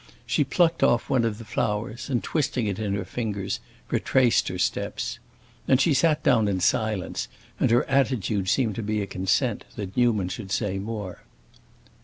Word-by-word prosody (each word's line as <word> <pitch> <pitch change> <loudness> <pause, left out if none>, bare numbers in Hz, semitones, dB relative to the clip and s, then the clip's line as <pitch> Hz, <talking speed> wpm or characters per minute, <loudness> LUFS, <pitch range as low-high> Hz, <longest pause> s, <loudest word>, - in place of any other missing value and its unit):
She - - +2
plucked 170 -2 +2
off 120 +3 +2
one 130 -3 +3
of 110 -2 -1
the 115 - -10
flowers 110 +4 -2
and, 125 -4 0
twisting 130 -6 0
it 100 -1 -2
in 100 -2 -1
her 100 -2 -3
fingers, 100 -2 -3 0.3
retraced 125 -3 +3
her 90 - -3
steps. 90 - -2 0.5
Then 130 - +5
she 150 +4 +3
sat 150 +2 +2
down 120 -7 +4
in 95 -2 0
silence, 100 - 0 0.3
and - - +3
her 120 +1 +3
attitude 115 -8 +1
seemed 115 -2 +2
to - - -1
be 105 -1 -1
a - - -3
consent 100 +5 0
that 100 -2 -6
Newman 110 -7 +2
should 95 +1 -6
say 95 -2 -1
more. 105 -3 -5
110 Hz, 175 wpm, -25 LUFS, 100-125 Hz, 0.5 s, Then